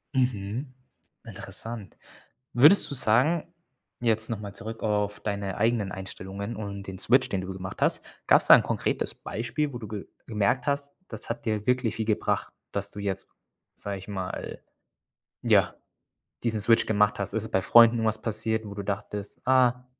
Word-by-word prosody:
Mhm. 125 +1 -1 0.5
Interessant. 110 -4 -8 0.6
Würdest 150 +11 +7
du 140 - -3
sagen, 140 +10 +2 0.5
jetzt 110 -2 +4
noch 115 -3 -3
mal 100 -1 -8
zurück 115 +2 -8
auf 105 -1 -1
deine 100 -2 -3
eigenen 110 -3 +1
Einstellungen 95 +3 -7
und 100 -2 -7
den 95 -1 -7
Switch, 130 +6 +3
den 95 - -1
du 95 +1 -6
gemacht 95 0 -8
hast - - +2 0.3
gab's - - +5
da - - +10
'n - - +4
konkretes - - -1
Beispiel, 130 +6 -3
wo - - -4
du 110 - -8
ge 105 -1 -7 0.2
gemerkt 115 +4 0
hast: 140 0 -1
Das 110 -2 -3
hat 115 +1 -5
dir 105 -2 -2
wirklich 125 -3 +1
viel 110 - -2
gebracht, 110 -1 -1 0.2
dass 100 0 -2
du 105 - -8
jetzt, 95 -1 -3 0.5
sage 100 -1 -5
ich 95 - -12
mal, 95 -3 -6 0.8
ja, - - +3 0.7
diesen 110 -3 +1
Switch, 115 +2 +4
gemacht 105 -1 +2
hast? 100 - -1
Ist 110 - 0
es 110 - -6
bei 95 - +2
Freunden 115 +2 +6
was 110 0 +2
passiert, 110 0 0
wo 100 - -7
du 100 - -4
dachtest: 100 0 -5
„Ah, 125 -1 +3
110 Hz, 170 wpm, -26 LUFS, 100-120 Hz, 0.8 s, da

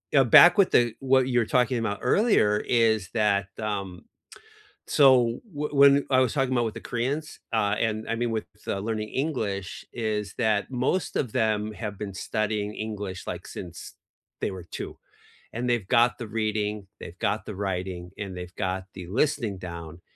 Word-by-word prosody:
uh, 135 - +7
back 175 - +8
with 195 - +4
the 120 -2 +4
what 130 -1 +3
you 125 -2 +2
were 115 - +1
talking 125 +2 +2
about 105 -3 -2
earlier 125 - +3
is 110 -5 +2
that, 100 -4 +2
um, 100 -4 -4 0.8
so 125 -4 +4
whe 150 -1 -3
when 140 0 +6
I 130 - +5
was 130 - +2
talking 135 -3 0
about 120 -2 +2
with 110 - -3
the - - -7
Koreans, 140 +6 -3
uh, 105 -2 +2
and 110 -1 -1
I 115 - 0
mean, 120 +1 -1
with, 110 -2 -2 0.2
uh, - - -1
learning 110 +1 -3
English, 110 - -3
is 105 -3 -3
that 110 -2 +1
most 130 +8 -1
of 125 - -1
them 110 -1 0
have 105 -2 -6
been 100 -1 -5
studying 105 +1 -2
English, 105 -4 -5
like, - - -6
since 85 -2 -8 0.5
they - - -1
were 95 -2 -7
2, - - -7 0.6
and 120 +2 -3
they've 115 -6 0
got 120 +1 +3
the 120 - -5
reading, 105 -2 -2
they've 85 - -9
got 105 +2 -1
the - - -6
writing, 90 -2 -4
and 100 -3 -5
they've 90 0 -8
got 95 -1 -2
the 90 -2 -8
listening 115 - 0
down- 85 -2 -8
110 Hz, 180 wpm, -26 LUFS, 100-125 Hz, 0.8 s, back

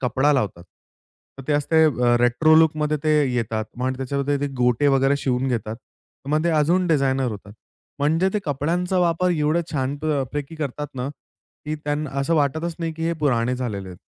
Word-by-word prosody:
कपडा 130 +3 +2
लावतात. 105 -10 -1 0.8
तर - - -7
ते - - +2
असते 150 +2 +3
अ, 125 -5 +3
रेट्रो 120 +6 +4
लूकमध्ये 155 -1 +3
ते 155 - +3 0.2
येतात 110 -2 -1 0.2
आणि 130 0 -1
त्याच्यामध्ये 140 +2 -1
ते 145 - 0
गोटे 125 +3 +2
वगैरे 135 0 +3
शिवून 130 -1 -1
घेतात. 115 -3 -2 0.5
मग 155 +2 +1
ते - - +2
अजून 165 +4 +2
डिझानयर 135 -5 +1
होतात. 100 -1 -9 0.5
म्हणजे 160 +6 +2
ते - - +2
कपड्यांचा 170 +5 -1
वापर 175 +1 +2
एवढं 155 0 +1
छान 135 -1 -1
प 150 - -10 0.3
पैकी 145 +1 -4
करतात 150 -1 -4
ना, 130 +1 -3 0.6
की 155 +1 -3
त्यांना 145 0 -2
असं 140 +5 +1
वाटतच 160 +3 0
नाही 165 -1 -3
की 160 +1 -5
हे 170 - +1
पुराने 125 -4 +1
झालेले 105 -7 -4
आहेत. 90 -1 -11
145 Hz, 180 wpm, -22 LUFS, 125-155 Hz, 0.8 s, रेट्रो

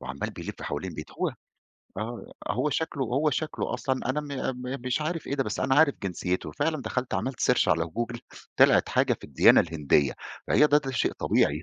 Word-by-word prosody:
وعمّال 65 +2 -4
بيلِف - - -8
حوالين 80 +6 -4
البيت 75 -2 -8
هو - - -1 0.6
آه، 115 +2 -6 0.2
هو 130 +6 0
شكله 160 -1 -2
هو 140 +5 +1
شكله 155 +1 -2
أصلًا 130 -1 -1
أنا 150 +3 -1
م 150 - -9 0.4
م 130 +2 -3
مش 125 +3 0
عارف 165 +1 -3
إيه 140 - -1
ده 135 - 0
بس - - -3
أنا 130 0 +2
عارف 145 0 +5
جنسيته، 90 -1 -2
فعلًا 150 0 -1
دخلت 125 0 -2
عملت 130 -1 -3
search 125 - +3
على 80 +1 +3
Google 120 +8 -4 0.4
طلعت - - +5
حاجة - - +2
في - - -14
الديانة - - +6
الهندية، 75 -4 +1 0.3
فهي 150 - +5
د - - -10
ده 150 -2 +2
شيء 125 - 0
طبيعي 75 +4 +1
125 Hz, 195 wpm, -27 LUFS, 90-145 Hz, 0.6 s, الديانة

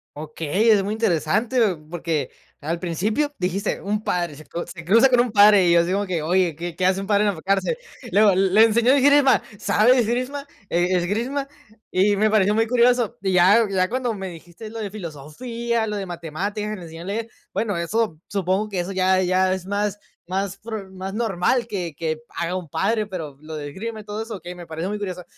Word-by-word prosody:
Okey, 155 +7 -1
es 210 -3 +5
muy 200 - -3
interesante, 215 +2 0 0.3
porque 160 -5 -2 0.3
al 165 +3 -3
principio 210 - -1
dijiste: 190 +3 -1
"Un 210 +2 -2
padre 175 -6 -1
se 155 +2 -13
cru 170 - -5
se 165 -3 -9
cruza 225 +9 +5
con 250 -2 +5
un 245 -1 -1
padre" 205 -2 +6
y - - +4
yo 170 - +6
así 175 +2 -1
como 200 +1 0
que: 180 -4 -2
"Oye, 175 +1 +2
¿qué 170 +2 -6
qué 185 - -1
hace 190 +1 +2
un 195 - -5
padre 205 0 +3
en 205 - +1
la 160 - -10
cárcel?". 195 - 0 0.3
Luego: 205 -1 +5
"Le 195 +2 +4
enseñó 230 +2 +3
esgrima", 280 0 +5 0.2
¿sabe 240 +6 +3
esgrima? 255 +5 -1 0.2
¿E 175 +2 +2
esgrima? 235 +10 -1 0.4
Y 200 +2 +3
me 215 +2 +3
pareció 210 -1 +3
muy 225 +1 +2
curioso, 240 -1 +2
y 190 -1 0
ya 190 +6 +5
ya 185 -1 +1
cuando 250 0 -2
me 195 -2 -5
dijiste 175 +4 -10
lo 230 - -6
de 205 -3 -4
filosofía, 220 - -4
lo 210 - -3
de 200 -1 -3
matemáticas, 185 +5 -4
que - - -3
les 185 - -10
enseñó 165 +1 -9
a - - -10
leer, 220 +4 -3 0.2
bueno, 205 -5 -1
eso 170 -1 -1
supongo 195 +1 0
que 195 -4 -2
eso 180 +3 -5
ya 185 0 +2
ya 185 +1 +2
es 190 -1 -5
más 205 +1 -1 0.3
más 195 +1 -2
prud 210 -2 -7
más 190 +1 -6
normal 225 +2 0
que 180 -8 -4
que 160 0 -2 0.2
haga 170 +2 -2
un 180 -3 -7
padre, 215 +8 0
pero 160 -8 -6
lo 155 +1 -8
de 145 -1 -5
esgrima 220 +8 -6
y - - -14
todo 210 +1 -5
eso, 225 0 -6
okey, 180 -1 -8
me 175 -1 -10
pareció 165 +3 -4
muy 210 - -2
interesan 185 -3 -5
195 Hz, 215 wpm, -22 LUFS, 175-220 Hz, 0.4 s, padre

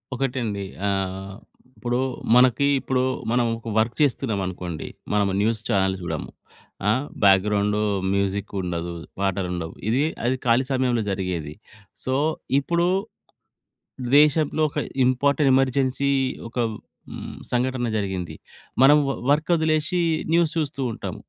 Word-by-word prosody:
ఒకటండి 120 -6 -2 0.2
ఆహ్, 95 0 -2 0.4
ఇప్పుడు 120 0 -1 0.4
మనకి 130 +2 +5
ఇప్పుడు 130 -1 0 0.3
మనం 120 0 +2
ఒక 115 0 -8
వర్క్ 115 +2 0
చేస్తున్నాం 125 -6 +1
అనుకోండి. 90 -3 -5 0.3
మనము 100 -2 +2
న్యూస్ 110 0 +1
చానెల్స్ 95 -3 +1
చూడము. 80 -3 -4 0.6
ఆ! - - +5 0.3
బ్యాక్‌గ్రౌండు 100 +1 +3 0.3
మ్యూజిక్ 100 +1 -1
ఉండదు. 85 -1 -3 0.3
పాటలుండవు. 90 -4 -2 0.2
ఇది 130 +6 +2 0.2
అది 125 +2 +2
ఖాళీ 120 +2 +3
సమయంలో 125 -3 +1
జరిగేది. 90 -6 -3 0.5
సో, 130 - -1 0.5
ఇప్పుడు 170 +4 0 1.3
దేశంలో 150 +1 +4
ఒక 145 - -9 0.3
ఇంపార్టెంట్ 140 +2 +3
ఎమర్జెన్సీ 135 +1 +1 0.4
ఒక 120 - -11 0.5
హ్మ్, - - -7 0.2
సంఘటన 125 0 0
జరిగింది. 95 -4 -3 0.5
మనం 140 +3 +8
వ - - +2 0.2
వర్క్ 150 +4 +1
వదిలేసి 160 +2 +1 0.3
న్యూస్ 170 -2 +3
చూస్తూ 150 -3 -2
ఉంటాం. - - -6
120 Hz, 115 wpm, -24 LUFS, 95-135 Hz, 1.3 s, మనం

